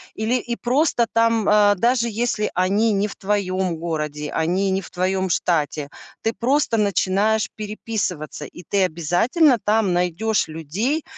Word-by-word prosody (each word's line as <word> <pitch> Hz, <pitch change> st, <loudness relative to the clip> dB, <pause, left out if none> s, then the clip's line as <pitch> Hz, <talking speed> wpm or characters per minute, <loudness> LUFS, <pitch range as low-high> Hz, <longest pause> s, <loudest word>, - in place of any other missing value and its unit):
Или, 220 Hz, +3 st, 0 dB
и 240 Hz, -1 st, -2 dB
просто 250 Hz, -1 st, +1 dB
там, 230 Hz, -2 st, +2 dB
э, 205 Hz, -1 st, +5 dB
даже 235 Hz, +3 st, +2 dB
если 220 Hz, -1 st, -1 dB
они 200 Hz, +5 st, +2 dB
не 200 Hz, +1 st, +1 dB
в 200 Hz, -, -9 dB
твоем 190 Hz, -3 st, -1 dB
городе, 150 Hz, -3 st, -4 dB
они 180 Hz, +5 st, 0 dB
не 190 Hz, +1 st, 0 dB
в -, -, -12 dB
твоем 185 Hz, +1 st, -1 dB
штате, 150 Hz, -4 st, 0 dB, 0.3 s
ты 225 Hz, -, 0 dB
просто 260 Hz, -1 st, +1 dB
начинаешь 210 Hz, +1 st, +1 dB
переписываться, 205 Hz, -8 st, -4 dB
и 175 Hz, -, -12 dB
ты 200 Hz, -1 st, +2 dB
обязательно 185 Hz, -, +2 dB
там 210 Hz, -3 st, +2 dB
найдешь 180 Hz, +4 st, 0 dB
людей, 190 Hz, -, -2 dB
200 Hz, 145 wpm, -21 LUFS, 175-225 Hz, 0.3 s, э